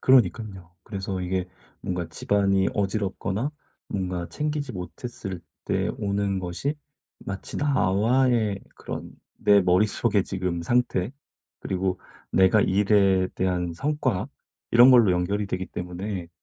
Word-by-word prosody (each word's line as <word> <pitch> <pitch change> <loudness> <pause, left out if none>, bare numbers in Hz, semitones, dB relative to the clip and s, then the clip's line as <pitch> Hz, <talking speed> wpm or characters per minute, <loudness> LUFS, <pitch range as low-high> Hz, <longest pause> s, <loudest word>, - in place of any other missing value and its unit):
그러니깐요. 100 -7 +2
그래서 95 -2 -4
이게 90 0 -2 0.3
뭔가 90 -2 -3
집안이 95 +3 +1
어지럽거나 100 +4 -1 0.4
뭔가 90 -3 -3
챙기지 150 -3 -3
못했을 95 0 -6 0.2
때 - - 0
오는 100 -1 0
것이 95 - -2 0.5
마치 95 0 -5
나와의 115 -4 +2 0.2
그런 - - -7 0.3
내 100 -1 +5
머릿속에 100 +3 +2
지금 90 -3 -3
상태 120 -1 +1 0.5
그리고 95 -1 -1 0.3
내가 95 +3 +5
일에 95 -1 +3
대한 90 -2 -1
성과 140 - -1 0.4
이런 120 +2 +8
걸로 115 -7 +6
연결이 100 +4 0
되기 95 -1 -3
때문에 90 0 -5
95 Hz, 265 characters per minute, -25 LUFS, 90-110 Hz, 0.5 s, 이런